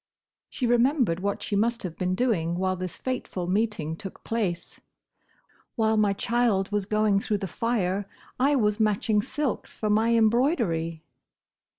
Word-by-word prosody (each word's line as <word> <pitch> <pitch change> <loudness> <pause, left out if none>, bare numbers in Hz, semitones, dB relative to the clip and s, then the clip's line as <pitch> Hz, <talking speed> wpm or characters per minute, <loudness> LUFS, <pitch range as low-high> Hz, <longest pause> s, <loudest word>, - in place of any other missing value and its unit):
She 255 - -3
remembered 240 - +2
what 200 +1 -2
she 205 - -2
must 230 +3 +1
have 175 -3 -5
been 185 0 -1
doing 185 -8 0
while 185 0 0
this 185 -1 -5
fateful 250 -8 -3
meeting 185 -5 -1
took 195 +2 -9
place. 205 -7 -3 1.0
"While 220 -2 +2
my 210 -2 +3
child 220 -2 +1
was 205 -2 -1
going 215 -2 +2
through 210 +1 -1
the 195 - -4
fire, 200 -3 -1 0.3
I 280 +3 +3
was 210 -4 +1
matching 210 0 +2
silks 285 +3 -3
for 215 -1 -1
my 225 +2 +3
embroidery!" 220 - +1
210 Hz, 150 wpm, -26 LUFS, 185-230 Hz, 1.0 s, my